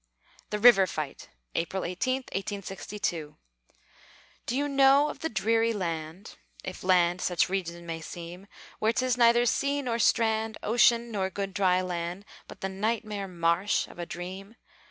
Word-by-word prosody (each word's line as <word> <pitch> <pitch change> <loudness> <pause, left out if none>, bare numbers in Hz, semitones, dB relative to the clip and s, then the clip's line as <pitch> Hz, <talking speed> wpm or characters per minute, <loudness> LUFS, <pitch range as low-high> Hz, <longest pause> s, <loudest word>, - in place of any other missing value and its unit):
THE 210 - -1
RIVER 210 -4 +7
FIGHT 155 -5 -6 0.2
[April 180 +3 -2
18, 255 +9 -1
1862] 195 -5 -4 1.1
Do 245 - -1
you 290 +1 0
know 275 +1 +5
of - - -7
the 320 - -2
dreary 225 +2 +1
land, 170 0 -5 0.3
If 185 - -7
land 180 -1 +3
such 180 0 +1
region 170 -3 -3
may 165 -1 -5
seem, 175 +4 -9 0.3
Where 220 +1 +2
'tis 255 0 +1
neither 240 0 +5
sea 280 +4 +1
nor 235 -2 -1
strand, 220 -1 +2
Ocean, 235 +1 +3
nor 190 -3 -1
good, 195 0 -4
dry 185 -2 +2
land, 180 +1 -4 0.2
But - - -12
the 195 - -1
nightmare 210 0 -2
marsh 175 +2 +1
of - - -14
a 170 - -4
dream? 190 +5 -7
195 Hz, 150 wpm, -28 LUFS, 180-230 Hz, 1.1 s, RIVER